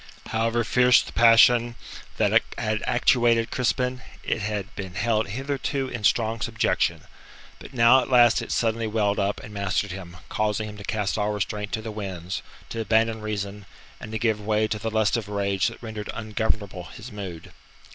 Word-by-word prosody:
However 115 Hz, +1 st, +1 dB
fierce 125 Hz, +4 st, +4 dB
the -, -, -10 dB
passion 120 Hz, +1 st, +6 dB, 0.4 s
that -, -, +4 dB, 0.2 s
had 110 Hz, 0 st, -1 dB
actuated 120 Hz, -2 st, +3 dB
Crispin, 125 Hz, 0 st, 0 dB, 0.2 s
it -, -, -1 dB
had 100 Hz, -1 st, -3 dB
been 95 Hz, -3 st, -7 dB
held 110 Hz, +2 st, +1 dB
hitherto 135 Hz, +3 st, -3 dB
in 120 Hz, -4 st, -6 dB
strong 115 Hz, +1 st, +2 dB
subjection. -, -, 0 dB, 0.6 s
But 135 Hz, -, -12 dB
now 120 Hz, +2 st, +6 dB
at -, -, -6 dB
last 120 Hz, -2 st, +5 dB
it -, -, -6 dB
suddenly 115 Hz, -1 st, 0 dB
welled 105 Hz, -2 st, 0 dB
up 100 Hz, +1 st, 0 dB
and 105 Hz, -, -10 dB
mastered 100 Hz, 0 st, -1 dB
him, 90 Hz, -2 st, -8 dB
causing 110 Hz, 0 st, -1 dB
him 105 Hz, -1 st, -9 dB
to 100 Hz, -, -9 dB
cast 105 Hz, -1 st, -1 dB
all 105 Hz, 0 st, +1 dB
restraint 105 Hz, 0 st, -3 dB
to 110 Hz, -, -2 dB
the 110 Hz, -, -5 dB
winds, 95 Hz, -4 st, -5 dB, 0.3 s
to 115 Hz, -, -3 dB
abandon 110 Hz, +1 st, +1 dB
reason, 100 Hz, -1 st, -5 dB, 0.3 s
and 110 Hz, -, -9 dB
to 110 Hz, -, -2 dB
give 110 Hz, -2 st, 0 dB
way 110 Hz, +1 st, +1 dB
to 105 Hz, -, -2 dB
the 115 Hz, +2 st, -2 dB
lust 110 Hz, 0 st, +2 dB
of 110 Hz, -3 st, -5 dB
rage 100 Hz, -2 st, 0 dB
that -, -, -7 dB
rendered 110 Hz, -2 st, -6 dB
ungovernable 105 Hz, -4 st, -2 dB
his 115 Hz, +7 st, -10 dB
mood. 95 Hz, -6 st, -8 dB
110 Hz, 175 wpm, -25 LUFS, 105-115 Hz, 0.6 s, passion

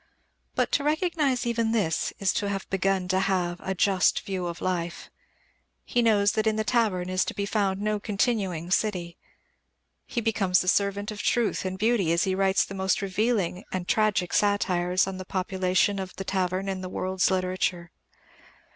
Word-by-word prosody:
But -, -, +1 dB
to 285 Hz, -, +1 dB
recognize 300 Hz, -5 st, +1 dB
even 230 Hz, -1 st, 0 dB
this 195 Hz, -8 st, 0 dB
is 195 Hz, -, +1 dB
to 205 Hz, -, -1 dB
have 195 Hz, -1 st, -3 dB
begun 195 Hz, -1 st, +1 dB
to 190 Hz, 0 st, +2 dB
have 180 Hz, -2 st, 0 dB
a 190 Hz, -, -3 dB
just 190 Hz, -1 st, +2 dB
view 185 Hz, -3 st, -3 dB
of 170 Hz, 0 st, -5 dB
life. 175 Hz, -2 st, -3 dB, 0.7 s
He 240 Hz, -, +1 dB
knows 205 Hz, -3 st, +4 dB
that 220 Hz, 0 st, 0 dB
in 215 Hz, -, +2 dB
the 220 Hz, -, 0 dB
tavern 215 Hz, -7 st, +1 dB
is 185 Hz, 0 st, +1 dB
to -, -, -5 dB
be 200 Hz, -, -2 dB
found 200 Hz, -2 st, 0 dB
no 210 Hz, 0 st, -1 dB
continuing 195 Hz, -5 st, -1 dB
city. 180 Hz, -5 st, -1 dB, 0.9 s
He 240 Hz, -, -2 dB
becomes 210 Hz, -5 st, +2 dB
the 180 Hz, -, -5 dB
servant 200 Hz, +2 st, +1 dB
of 210 Hz, -1 st, -6 dB
truth 235 Hz, -3 st, 0 dB
and 185 Hz, 0 st, -3 dB
beauty 215 Hz, -5 st, +2 dB
as 170 Hz, 0 st, +2 dB
he 190 Hz, -, 0 dB
writes 195 Hz, 0 st, +2 dB
the -, -, -9 dB
most 190 Hz, +1 st, 0 dB
revealing 195 Hz, -2 st, 0 dB
and 180 Hz, -1 st, -3 dB
tragic 210 Hz, -5 st, +1 dB
satires 185 Hz, -3 st, +2 dB
on 190 Hz, -1 st, -5 dB
the 185 Hz, -, -6 dB
population 185 Hz, +1 st, 0 dB
of 190 Hz, -1 st, -6 dB
the 195 Hz, -, -5 dB
tavern 185 Hz, 0 st, -1 dB
in 190 Hz, -1 st, -3 dB
the 185 Hz, -, -5 dB
world's 185 Hz, +1 st, 0 dB
literature. 185 Hz, -2 st, -1 dB
195 Hz, 180 wpm, -26 LUFS, 185-210 Hz, 0.9 s, knows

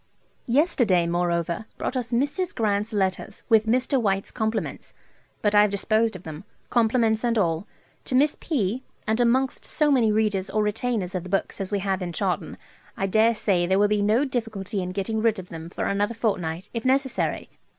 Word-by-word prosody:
Yesterday, 240 Hz, -, +3 dB
moreover, 170 Hz, +2 st, -1 dB
brought -, -, -3 dB
us 245 Hz, -2 st, -2 dB
"Mrs. 285 Hz, +9 st, 0 dB
Grant's 210 Hz, -1 st, 0 dB
Letters," 195 Hz, -1 st, -2 dB
with 220 Hz, -1 st, +4 dB
Mr. 255 Hz, +3 st, +2 dB
White's 195 Hz, -2 st, 0 dB
compliments; 220 Hz, -1 st, -3 dB, 0.5 s
but 210 Hz, -1 st, +2 dB
I 205 Hz, -, +7 dB
have 210 Hz, -, +4 dB
disposed 215 Hz, +2 st, +1 dB
of 185 Hz, -, -9 dB
them, 155 Hz, 0 st, -8 dB, 0.3 s
compliments 225 Hz, -1 st, +2 dB
and 235 Hz, -1 st, +1 dB
all, 170 Hz, -1 st, 0 dB, 0.4 s
to 255 Hz, -, -1 dB
Miss 290 Hz, +3 st, +4 dB
P., 245 Hz, -, -1 dB, 0.2 s
and 220 Hz, +2 st, 0 dB
amongst 255 Hz, +2 st, +2 dB
so 300 Hz, -1 st, +1 dB
many 235 Hz, -6 st, +4 dB
readers 210 Hz, -3 st, 0 dB
or 215 Hz, 0 st, +1 dB
retainers 210 Hz, -2 st, -1 dB
of 185 Hz, -1 st, -3 dB
books 195 Hz, +1 st, -1 dB
as 195 Hz, -, -3 dB
we 205 Hz, -, +1 dB
have 195 Hz, -1 st, -1 dB
in 175 Hz, -1 st, -4 dB
Chawton, -, -, -2 dB, 0.4 s
I 195 Hz, -, 0 dB
dare 220 Hz, +4 st, +3 dB
say 180 Hz, -5 st, +1 dB
there 190 Hz, +1 st, +2 dB
will 205 Hz, +1 st, +4 dB
be 210 Hz, 0 st, +1 dB
no 220 Hz, +7 st, +3 dB
difficulty 220 Hz, -6 st, -3 dB
in 180 Hz, -, -3 dB
getting 210 Hz, +3 st, -2 dB
rid 225 Hz, -1 st, +2 dB
of 185 Hz, -1 st, -8 dB
them 165 Hz, 0 st, -8 dB
for -, -, -4 dB
another 205 Hz, +3 st, 0 dB
fortnight, 185 Hz, -5 st, -2 dB
if 230 Hz, -2 st, -3 dB
necessary. 265 Hz, 0 st, 0 dB
215 Hz, 185 wpm, -25 LUFS, 190-235 Hz, 0.5 s, I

